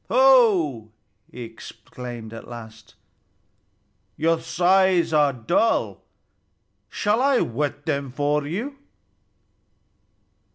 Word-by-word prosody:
"Ho!" 210 - +4 0.4
he 125 - -8
exclaimed 115 0 -10
at 115 - -10
last, 115 -1 -12 1.2
"your 165 0 +1
scythes 180 -1 +2
are 145 -2 +4
dull. 135 - 0 0.9
Shall 210 +3 0
I 275 -1 +3
whet 145 +4 -3
them 140 -4 -2
for 145 +2 -1
you?" 240 - -4
150 Hz, 85 wpm, -23 LUFS, 120-195 Hz, 1.2 s, Ho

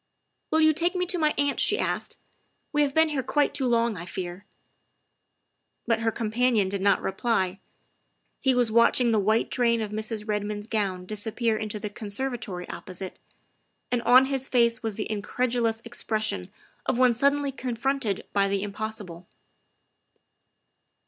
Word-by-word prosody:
" - - -51
Will 315 - +3
you 315 0 +6
take 345 +4 +1
me 360 0 +1
to 360 0 -1
my 305 -1 +2
aunt?" 285 0 +1
she - - +2
asked. - - -2 0.3
" - - -46
We 295 - +3
have 280 -2 +1
been 320 0 +5
here 290 -3 -1
quite 290 +3 +1
too 265 - -1
long, 235 -3 +2
I 175 +2 -7
fear." 180 +2 -6 1.4
But 230 -2 +1
her 225 0 +1
companion 225 -2 +1
did 200 0 -3
not 200 0 +3
reply. 195 -2 0 0.8
He 265 -2 +2
was 245 -3 +2
watching 235 +1 +4
the 220 - +3
white 215 +3 +1
train 235 -2 +2
of 215 -2 -3
Mrs. 215 0 -3
Redmond's 210 0 -2
gown 195 -5 -2
disappear 220 +3 0
into 215 -1 -3
the 205 0 -5
conservatory 210 -4 -4
opposite, 185 0 -7 0.7
and 245 -1 +1
on 250 +2 +6
his 270 -1 -2
face 235 -1 +2
was 225 -3 -3
the 215 - -2
in 215 -2 -3
credulous 230 0 0
expression 215 - -2 0.4
of 250 - +1
one 250 -1 +5
suddenly 280 +3 +2
confronted 250 -4 -2
by 200 -1 +3
the 195 0 -1
impossible. 205 -4 -6
225 Hz, 160 wpm, -26 LUFS, 205-255 Hz, 1.4 s, you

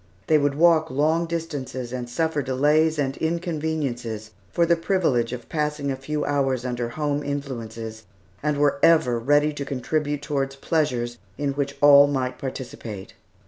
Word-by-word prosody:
They 155 - +4
would 145 -1 +1
walk 160 0 +4
long 160 +5 +1
distances 145 -7 -4
and 125 -1 -4
suffer 160 +3 0
delays 150 +4 +2
and 135 -2 -1
inconveniences 155 - -2 0.2
for 170 - +2
the 170 0 +4
privilege 165 - +1
of 125 -2 -7
passing 150 -2 -1
a - - -1
few 150 +3 -3
hours 135 -3 0
under 120 -1 -2
home 145 +2 -1
influences, 115 -6 -5 0.4
and 150 -1 0
were 145 -1 +2
ever 125 -8 +4
ready 145 +5 +3
to 145 - -4
contribute 145 +2 -2
toward 135 -2 -2
pleasures 125 -7 -1 0.2
in 145 -1 -1
which 140 0 -3
all 145 -1 +8
might 130 -2 -2
participate. 120 -7 -7
140 Hz, 150 wpm, -24 LUFS, 125-155 Hz, 0.4 s, all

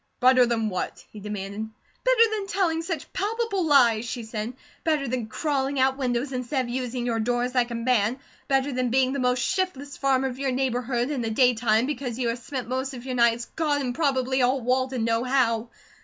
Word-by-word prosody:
"Better 255 -1 +6
than 225 -2 0
what?" 185 -2 -4
he 215 - -10
demanded. 210 +1 -5 0.3
"Better - - +5
than 415 -2 -2
telling 345 -4 0
such 330 -3 -5
palpable 410 -3 -1
lies," 240 -7 +5
she 240 0 -5
said. 220 +1 -4 0.3
"Better 305 -4 +1
than 240 -2 -2
crawling 275 +1 -1
out 265 0 +3
windows 255 +1 -1
instead 255 +1 -1
of - - -8
using 250 0 -3
your 230 -2 0
doors 245 +2 0
like 245 -2 +2
a 235 - -4
man; 230 -1 +1 0.3
better 270 0 +1
than 250 -1 0
being 260 +1 +2
the 280 - -2
most 250 0 +1
shiftless 290 -7 -2
farmer 270 -1 +2
of 255 0 -6
your 275 -1 0
neighbourhood 250 0 -1
in 275 -4 -2
the 225 - -2
daytime, 230 -1 +3
because 255 -4 -3
you 245 -2 0
have 230 +1 -2
spend 250 -1 -5
most 260 +2 -2
of 245 0 -9
your 260 - -3
nights, 235 -1 +3
God 300 -3 +1
and 255 -3 -2
probably 265 -3 +1
all 255 +2 +3
Walden 255 0 0
know 230 +1 +1
how. 240 -3 +1
255 Hz, 200 wpm, -25 LUFS, 235-275 Hz, 0.3 s, Better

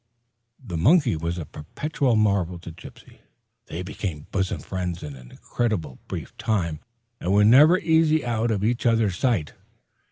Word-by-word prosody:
The 90 -6 -4
monkey 140 - +4
was 85 +2 -3
a 85 - -5
perpetual 125 - -2
marvel 100 -5 +1
to 85 0 -10
Gypsy. 85 +2 -14 0.5
They 85 +3 -5
became 90 -5 -5
bosom 95 -2 -1
friends 90 -2 -4
in 75 -2 -7
an 60 -2 -14
incredibly 90 - -3
brief - - -7
period, 85 -9 -1 0.4
and 90 - -2
were 105 +1 +5
never 150 - +7
easy 160 -3 +2
out 115 -1 0
of 105 -3 -1
each 120 +2 +1
other's 110 -5 +2
sight. 110 - 0
100 Hz, 155 wpm, -24 LUFS, 85-120 Hz, 0.5 s, never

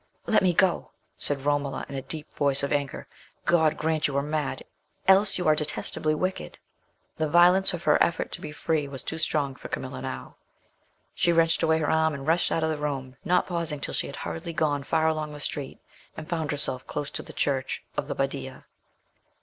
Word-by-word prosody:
"Let 220 - +4
me 185 -2 +4
go!" 180 0 +2 0.3
said 140 -1 -1
Romola, 145 -1 0
in - - -9
a 135 - -3
deep 150 +3 -6
voice 140 -1 +1
of 140 - 0
anger. 140 -2 -2 0.4
"God 160 -2 +3
grant 160 0 +1
you 140 -1 -2
are 140 - +1
mad! 150 -3 -2 0.4
else 195 +1 +6
you 180 -3 -1
are 155 - +6
detestably 155 0 -1
wicked!" 185 +4 -3 0.6
The 155 -1 0
violence 180 +4 +6
of 175 -1 -5
her - - +4
effort 170 - +1
to - - -5
be - - -6
free 150 -1 -1
was 135 -2 -6
too 160 - -4
strong 145 -3 0
for - - -9
Camilla - - -5
now. 65 0 -6 0.8
She 170 - +2
wrenched 165 -1 +3
away 160 0 +3
her 155 -2 0
arm 160 -1 +2
and 135 -1 -7
rushed 165 +3 +2
out 165 - +1
of 160 - +1
the 155 - -3
room, 135 -3 -3
not 180 0 +3
pausing 170 -4 -2
till - - -4
she - - -1
had - - -7
hurriedly 85 - -5
gone 145 -3 +1
far 160 +3 +1
along 155 -1 -1
the 150 - -8
street, 145 -1 -3 0.4
and 155 - -7
found 160 -4 -2
herself 130 -3 -1
close 145 -1 -3
to - - -2
the - - -11
church 135 -2 -1
of - - -2
the - - -3
Badia. - - -3
155 Hz, 205 wpm, -27 LUFS, 140-165 Hz, 0.8 s, else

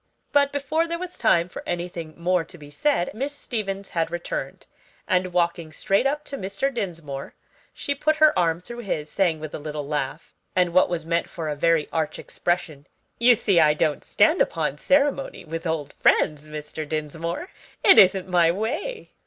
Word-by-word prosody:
But 280 -1 +4
before 295 +4 0
there 335 0 -2
was 360 0 -6
time 170 0 +3
for 180 - -8
anything 175 -2 -4
more 180 0 +1
to 175 +2 -11
be 145 -2 -13
said 225 - 0
Miss 275 +6 -3
Stevens 200 -7 -4
had 165 -1 0
returned, 175 0 -5 0.4
and 185 -2 +1
walking 170 -2 0
straight 195 +10 +1
up 295 +2 -2
to 275 - -5
Mr. 200 +9 -2
Dinsmore, 165 - -5 0.4
she 285 - -3
put 305 +3 +1
her 310 0 +6
arm 170 -1 +1
through 240 +6 -9
his, 155 -9 -3
saying 175 -5 +1
with 155 -1 -7
a - - -4
little 150 -1 -5
laugh, 145 +1 -3 0.2
and 180 -2 +2
what 185 - +5
was 170 -3 -3
meant 170 0 0
for 165 -3 -4
a 150 - -2
very 165 0 +2
arch 155 -1 -1
expression, 160 -5 -3 0.3
"You 240 +1 +6
see 200 -5 +2
I 150 -2 +5
don't 150 -1 0
stand 320 +3 +3
upon - - 0
ceremony 280 -4 +1
with 165 +2 -5
old 160 -3 -2
friends, 150 0 +3
Mr. 150 0 -6
Dinsmore. 160 - -3 0.3
It 385 - +8
isn't 190 -1 +5
my 175 -2 +4
way." 220 - -3
175 Hz, 180 wpm, -24 LUFS, 155-235 Hz, 0.4 s, It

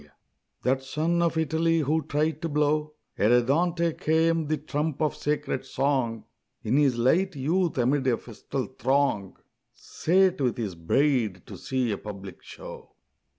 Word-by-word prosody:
_ 75 - -20 0.5
That 130 +2 +1
son 160 +6 0
of 170 -1 +1
Italy 160 +1 +1
who 155 +3 +1
tried 155 +1 -1
to 165 - -2
blow, 150 +1 0 0.2
Ere 120 +4 +5
Dante 170 +5 +1
came, 160 0 +1
the 155 +1 0
trump 150 0 -3
of 155 -1 0
sacred 150 -3 -2
song, 130 -5 -1 0.4
In 115 +2 0
his 140 -5 +3
light 165 +10 +2
youth 165 +5 0
amid 130 +2 +1
a 120 -3 +3
festal - - -5
throng 130 -6 0 0.4
Sate 185 0 +1
with 125 -3 0
his 105 -6 -3
bride 110 - 0
to - - -9
see 130 -3 -1
a 100 - -3
public 100 -2 -9
show. - - -11
145 Hz, 150 wpm, -26 LUFS, 125-160 Hz, 0.5 s, Ere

